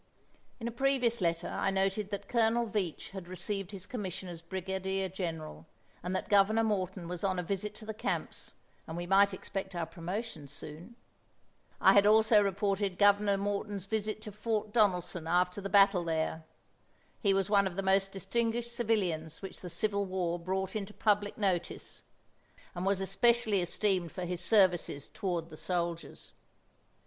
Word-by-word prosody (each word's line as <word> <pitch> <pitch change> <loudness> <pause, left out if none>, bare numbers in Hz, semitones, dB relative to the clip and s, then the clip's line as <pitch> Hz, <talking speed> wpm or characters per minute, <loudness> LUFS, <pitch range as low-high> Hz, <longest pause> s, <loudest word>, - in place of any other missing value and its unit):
In 230 - -4
a - - -2
previous 245 -3 +1
letter 170 -1 0
I - - -1
noted 195 +1 0
that 200 -1 -5
Colonel 235 0 +2
Veatch 195 -7 -3
had 190 -3 -7
received 195 +1 -4
his 195 -3 -7
commission 190 -6 -5
as 170 -2 -7
brigadier 190 +2 -2
general, 160 - -5 0.3
and 180 +2 -3
that - - -2
Governor 205 +2 +4
Morton 190 -4 -1
was 180 +1 -5
on 190 -2 +1
a 180 - -1
visit 200 +4 -3
to 220 - -11
the 220 - -4
camps 215 - -3 0.3
and 160 - -5
we 175 - -3
might 195 +2 +5
expect 190 0 -5
our 170 -1 -1
promotions 170 - -6
soon. 160 +10 -9 0.8
I - - +7
had 200 0 +6
also 220 0 +6
reported 200 -1 0
Governor 205 0 +4
Morton's 200 -1 -2
visit 215 +1 -2
to 210 - -7
Fort 215 0 -2
Donelson 180 -6 +2
after 180 +3 +1
the 195 - -4
battle 195 -2 +5
there. 160 -1 -2 0.8
He 200 - +3
was 195 +1 +1
one 200 -2 +5
of 180 - -6
the 195 - -2
most 195 0 +3
distinguished 235 +4 -1
civilians 190 -9 -1
which 190 - -7
the 180 - -6
Civil 200 +3 -1
War 175 -2 -1
brought 190 +3 -2
into 210 -1 -4
public 205 -1 +1
notice, 190 -5 -2 0.7
and 180 +2 -3
was 195 -1 +2
especially 215 +1 +3
esteemed 180 -1 0
for 185 - -4
his 180 0 -3
services 180 -8 +2
toward 175 -5 -3
the 155 - -9
soldiers. 170 -1 -3
195 Hz, 165 wpm, -31 LUFS, 180-210 Hz, 0.8 s, I